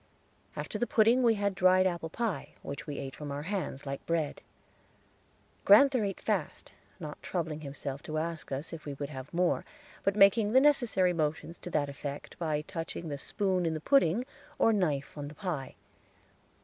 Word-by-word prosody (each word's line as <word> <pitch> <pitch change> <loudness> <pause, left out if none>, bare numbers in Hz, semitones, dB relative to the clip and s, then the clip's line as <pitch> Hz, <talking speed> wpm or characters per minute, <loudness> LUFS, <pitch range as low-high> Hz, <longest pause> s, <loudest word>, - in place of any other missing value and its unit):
After - - -4
the 240 - +1
pudding 230 +3 +4
we 230 -2 +4
had 200 -1 0
dried 185 0 +5
apple 170 -3 -1
pie, 205 -5 -3
which 140 - -6
we 145 - -4
ate 135 -1 -5
from 150 -2 -6
our 145 +1 -4
hands, 160 -7 -3
like 140 0 -4
bread. 165 -3 -1 1.2
Grand'ther 250 +4 +7
ate 195 -2 -2
fast, - - -2 0.3
not 150 -3 -7
troubling 160 -4 -3
himself 140 -1 -6
to 155 - -4
ask 165 -1 -3
us 140 +5 -4
if 165 - -8
we 145 -2 -5
would 140 0 -5
have 135 -1 -8
more, 175 0 +1 0.4
but 195 0 +2
making 210 +2 +5
the 260 - +8
necessary 240 -11 +3
motions 160 +1 -2
to - - -7
that 150 -4 +1
effect 140 0 -7
by 155 -3 0
touching 165 +1 -5
the 145 - -3
spoon 190 +2 0
in 165 -1 0
the - - -3
pudding 240 - +3 0.3
or 225 - +4
knife 150 -9 0
on 145 - -4
the 150 - -10
pie. 170 -10 -4
165 Hz, 180 wpm, -30 LUFS, 145-200 Hz, 1.2 s, the